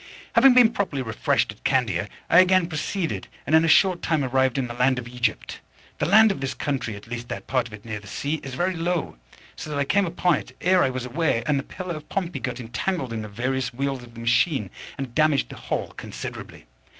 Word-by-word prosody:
Having 250 +2 +7
been 240 -3 +7
properly 165 - -2
refreshed 110 -3 0
at - - -17
Candia, - - +1 0.2
I 170 - +6
again 185 -1 +5
proceeded, 165 +2 -3 0.2
and 150 - -2
in 160 - +6
a - - +2
short 175 +3 +4
time 155 -3 +1
arrived 130 0 +1
in 135 - 0
the 120 - -6
land 125 +2 +2
of 120 -1 -5
Egypt. 120 -2 -2 0.4
The - - +1
land 215 +4 +7
of 190 - -5
this 135 0 -3
country, 130 -7 -2
at 100 - -11
least 120 0 -6
that 120 - -5
part 130 -2 0
of 115 - -15
it 105 - -17
near 110 -2 -4
the 100 - -14
sea, 145 +9 -3
is 135 -2 -7
very 180 +5 0
low, 170 - -2 0.4
so - - -7
that 150 - -3
I 140 - +2
came 200 +5 +2
upon 175 -1 +2
it - - -10
ere 185 0 +4
I 135 - +3
was 130 -1 -4
aware, 125 -3 0
and 140 0 +2
the - - -4
Pillar 185 +2 -6
of 155 - -10
Pompey 180 -3 -2
got 125 -1 -4
entangled 125 - -3
in 110 - -3
the 110 - -6
various 125 +4 -2
wheels 135 0 -2
of 120 -1 -14
the - - -9
machine, 115 - +1 0.3
and 135 -3 -5
damaged 155 -1 +2
the - - -9
whole - - -3
considerably. - - -8
140 Hz, 235 wpm, -24 LUFS, 120-175 Hz, 0.4 s, Having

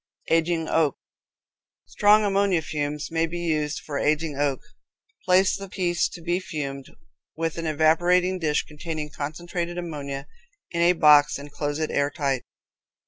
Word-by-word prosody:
Aging 165 0 +2
Oak. 155 -4 +1 0.9
Strong 210 +1 +4
ammonia 195 -4 +2
fumes 150 -1 -3
may 165 0 +1
be 175 +2 -5
used 155 -3 -1
for 145 -2 -4
aging 155 0 0
oak. 140 -1 0 0.7
Place 185 +1 +4
the 195 -1 -7
piece 175 -2 0
to 175 - -10
be 175 +2 0
fumed, 140 -7 -5 0.5
with 165 0 -2
an 165 - -3
evaporating 175 +4 +3
dish 150 -3 +1
containing 150 0 -6
concentrated 170 +4 -4
ammonia, 145 -5 -5 0.5
in 170 - -1
a 175 +1 +5
box, 150 -3 +5
and 145 +1 -10
close 145 0 -3
it 155 -1 -2
airtight. 140 -2 0
160 Hz, 140 wpm, -25 LUFS, 150-175 Hz, 0.9 s, a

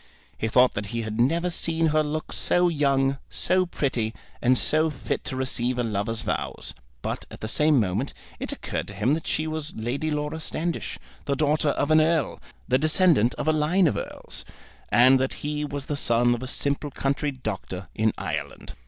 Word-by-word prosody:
He 110 - -2
thought 125 +3 +5
that 100 0 -3
he 115 +3 -3
had 110 +1 -4
never 170 +8 +2
seen 165 -1 0
her 155 0 +3
look 155 +1 -3
so 175 0 +3
young, 140 -3 +2
so 185 0 +1
pretty, 120 -9 -1 0.3
and 125 +1 +4
so 155 +5 +3
fit 140 -4 -3
to - - -2
receive 130 -1 0
a 125 - +1
lover's 110 0 -1
vows. 115 - -3 0.3
But - - -3
at - - -11
the 110 - -3
same 150 +4 +3
moment 105 +6 0 0.3
it - - -3
occurred - - -4
to 100 - -9
him 110 +8 +2
that 160 0 -2
she 155 - 0
was 155 -1 -4
Lady 125 +8 -2
Laura 150 +1 -2
Standish, 165 +1 -3 0.3
the 140 - 0
daughter 150 +1 +2
of 145 +1 0
an 155 0 +7
Earl, 160 -3 +1 0.3
the 130 - +3
descendant 155 - +4
of - - -4
a 155 - +4
line 160 +5 +3
of 155 - +2
Earls, - - -5 0.5
and 130 +2 +6
that 130 0 0
he 150 0 -1
was 145 -2 -4
the 145 - -2
son 120 -2 +3
of 120 - -3
a 130 - -4
simple 140 +2 -1
country 140 +2 -1
doctor 95 -8 -5
in 110 0 +2
Ireland. 75 -6 -5
140 Hz, 195 wpm, -25 LUFS, 120-155 Hz, 0.5 s, an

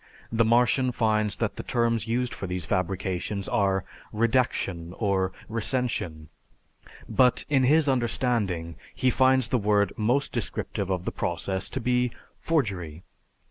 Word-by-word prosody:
The 115 0 +3
Martian 125 +3 +3
finds 110 -3 +1
that 115 -3 -2
the - - -3
terms 115 -2 0
used 125 +2 -1
for 95 - -5
these 90 -1 -3
fabrications 95 +2 -2
are 95 -2 +1 0.3
"redaction" 105 -7 0
or 95 -3 +1 0.2
"recension," 110 - -2 0.8
but, 125 -1 +3
in 135 -3 +3
his 150 +3 +4
understanding, 115 -9 0 0.2
he 130 - +2
finds 130 -1 +3
the 125 - +2
word 105 -1 +2
most 125 +6 +1
descriptive 95 - -3
of 90 -2 -2
the - - -1
process 95 +3 -2
to 130 - -3
be 125 0 +1 0.3
forgery. 95 - -1
110 Hz, 135 wpm, -26 LUFS, 95-125 Hz, 0.8 s, his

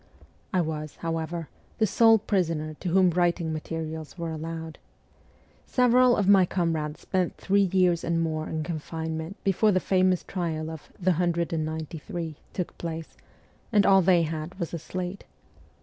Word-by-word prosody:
I 185 - +2
was, 155 -2 -4
however, 165 0 -3 0.3
the 220 - +3
sole 225 +2 +5
prisoner 165 -7 -1
to 180 - -3
whom 185 0 +4
writing 170 -1 +1
materials 160 +1 -5
were 170 -1 -3
allowed. 160 0 -6 0.9
Several 250 0 +4
of 200 - +1
my 195 -2 +7
comrades 165 -4 -1
spent 185 -2 -1
three 200 -1 +2
years 180 -3 +3
and 170 0 0
more 155 -1 -1
in 155 -1 -2
confinement 160 +2 -4
before 200 +2 +3
the 185 - +3
famous 185 -1 +2
trial 160 -4 -3
of 160 -2 -10
' - - -26
the 185 0 +2
hundred 170 -1 0
and 160 -1 0
ninety 160 0 -5
three 160 -1 -5
' - - -33
took 180 - -3
place, 165 -1 -5 0.6
and 205 -3 +4
all 195 0 +6
they 175 -1 +4
had 160 +3 -4
was 170 -3 -3
a 170 - -2
slate. 180 +4 -5
170 Hz, 165 wpm, -27 LUFS, 160-185 Hz, 0.9 s, my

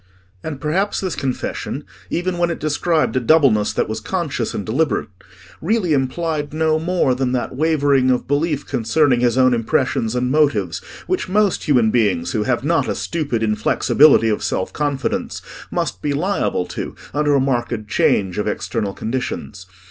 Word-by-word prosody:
And 150 -4 -5
perhaps 180 +8 0
this 185 -3 -3
confession, 130 -2 -3 0.3
even 175 +1 -2
when 175 0 +2
it 170 - -2
described 155 +1 0
a - - +3
doubleness 125 -6 +3
that - - 0
was 110 0 -3
conscious 150 - -3
and 100 - -3
deliberate, 145 +8 0 0.5
really 185 -2 +1
implied 150 +2 -1
no 160 0 +2
more 170 -5 +1
than 125 0 -1
that 125 0 -2
wavering 140 -3 +2
of 125 -1 +1
belief 145 +1 0
concerning 130 +1 +2
his 120 0 +2
own 130 -1 +5
impressions 115 0 0
and 125 +1 0
motives 150 -1 +1 0.3
which 370 - -2
most 205 0 +1
human 120 -7 +3
beings 100 -8 +1
who 110 - 0
have 120 +2 0
not 155 -2 +1
a - - -1
stupid 145 -9 -2
inflexibility 110 +4 +4
of 105 - -1
self 95 - -2
confidence 145 -3 -2 0.3
must 90 - -2
be 145 - -1
liable 165 - 0
to - - -6 0.2
under 145 0 +2
a - - +4
marked 120 -4 -1
change 100 -3 +1
of 105 - -1
external 105 -1 -2
conditions. 110 -5 -4
135 Hz, 165 wpm, -20 LUFS, 115-160 Hz, 0.5 s, own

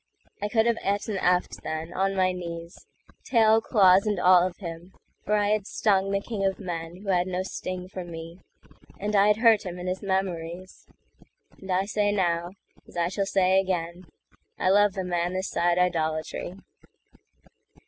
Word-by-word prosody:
I 205 - 0
could 220 0 +2
have 235 -1 +1
eat 200 +1 -1
an 200 -3 -2
eft 180 0 +1
then, 160 +2 -5
on 195 +1 0
my 185 -1 +2
knees, 170 -1 -8 0.4
Tail, 225 -2 +4
claws, 195 -3 +4
and 205 -3 0
all 180 0 +6
of 180 - -9
him; 170 0 -8 0.3
for 210 - +1
I 205 -1 +2
had 210 -2 +1
stungThe 195 -1 0
king 215 -4 -3
of 195 -1 0
men, 175 -1 -6
who 200 - -6
had 180 -1 +2
no 185 0 -2
sting 185 -1 -5
for 185 -1 -7
me, 165 0 -9 0.6
And 210 +1 -2
I 200 +1 +5
had 210 0 +4
hurt 225 -2 +5
him 180 -1 -6
in 180 - -7
his 185 +1 -3
memories; 185 -2 -4 0.7
And 190 -1 -7
I 185 +1 +1
say 205 0 0
now, 175 -3 0 0.4
as - - -12
I 170 0 +1
shall 195 +1 -2
say 190 -1 +3
again,I 180 -1 -4
love 205 0 +4
the 190 - -3
man 175 0 -1
this 185 +1 -3
side 175 0 +1
idolatry. 165 -1 -1
185 Hz, 175 wpm, -26 LUFS, 175-200 Hz, 0.7 s, all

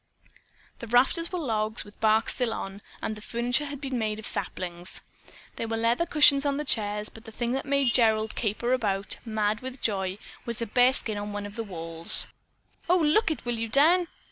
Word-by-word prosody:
The 235 - -7
rafters 265 +8 +2
were 365 - -2
logs 220 -7 -1
with 205 - -15
the - - -31
bark 220 0 +3
still 245 -3 +1
on, 195 +1 -6 0.2
and 215 - -2
the 210 - -10
furniture 245 +6 0
had 285 -1 -6
been 265 -3 -3
made 215 -1 -1
of 220 - -1
saplings. 175 0 -2 0.5
There 230 - -3
were 225 0 -2
leather 235 +9 +1
cushions 295 -3 +6
in 280 -1 0
the 300 - -3
chairs, 210 -4 -1
but 225 +1 -14
the 225 - -10
thing 235 +2 -2
that 270 +2 -2
made 275 -3 +2
Gerald 220 -2 +3
caper 235 +3 -1
about, 200 -5 -1
mad 215 -1 0
with 260 +1 -7
joy, 190 -4 -1 0.3
was 235 -2 -4
a 230 - -2
bearskin 245 -2 +2
on 205 0 -5
one 205 0 -4
of 205 0 -9
the 230 - -3
walls. 165 -4 +2 0.6
"Oh, 360 - +5
look 330 +6 +3
it, 315 - -4
will 240 -1 -2
you, 230 0 -3
Dan? 335 +8 +4
230 Hz, 205 wpm, -27 LUFS, 210-265 Hz, 0.6 s, cushions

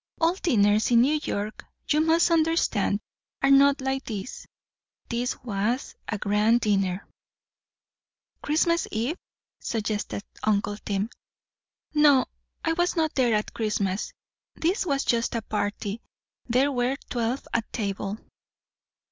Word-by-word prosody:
"All 330 +1 +3
dinners 215 - +2
in 235 -1 +6
New 300 +5 +3
York, 210 -5 -4 0.2
you 305 0 +3
must 325 +2 +3
understand, 315 - +2 0.4
are 275 - +5
not 275 0 +6
like 265 0 -1
this; 210 0 -6 0.6
this 245 +1 -1
was 230 +3 -1
a 215 - -2
grand 210 +4 +2
dinner." 195 -3 0 1.3
"Christmas 335 +3 +1
eve?" 240 +10 -2 0.4
suggested 210 -2 -3 0.2
uncle 205 -1 +1
Tim. 205 +2 -2 0.8
"No. 295 -3 +5 0.4
I 325 - +2
was 350 +2 +1
not 320 -2 +1
there 245 -4 +3
at 210 - -2
Christmas; 210 -3 -1 0.4
this 365 +3 0
was 275 -2 +1
just 235 0 +1
a 230 - -2
party. 205 +1 -3 0.5
There 260 +4 +3
were 250 +1 0
twelve 240 +2 -1
at 230 -2 -1
table. 200 -2 -3
235 Hz, 120 wpm, -26 LUFS, 210-285 Hz, 1.3 s, in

